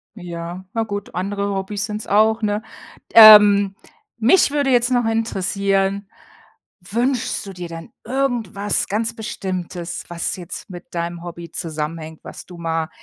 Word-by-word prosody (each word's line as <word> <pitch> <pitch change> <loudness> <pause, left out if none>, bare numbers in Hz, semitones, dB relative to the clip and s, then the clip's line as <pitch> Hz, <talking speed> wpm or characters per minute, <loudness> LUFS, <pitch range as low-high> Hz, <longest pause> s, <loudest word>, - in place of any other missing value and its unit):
Ja, 175 -1 -7
na 225 - 0
gut, 205 -2 -6
andere 200 +2 -2
Hobbys 200 +2 -3
sind's 210 -1 -6
auch, 220 +2 +3
ne? 210 0 -1 0.5
Ähm, 210 -3 +9 0.4
mich 250 +9 +4
würde 285 -2 0
jetzt 245 0 +3
noch 245 -2 +2
interessieren, 200 -2 0 0.7
wünschst 235 +6 -1
du 195 - -7
dir 180 -2 -7
denn 165 +4 -9
irgendwas 235 -7 -1
ganz 225 +3 -1
Bestimmtes, 185 -6 -5
was 170 -1 -3
jetzt 180 +2 -9
mit 175 -1 -11
deinem 170 0 -4
Hobby 170 -1 -8
zusammenhängt, 160 0 -5
was - - -10
du 175 -1 -12
mal 165 -1 -2
200 Hz, 140 wpm, -20 LUFS, 175-220 Hz, 0.7 s, Ähm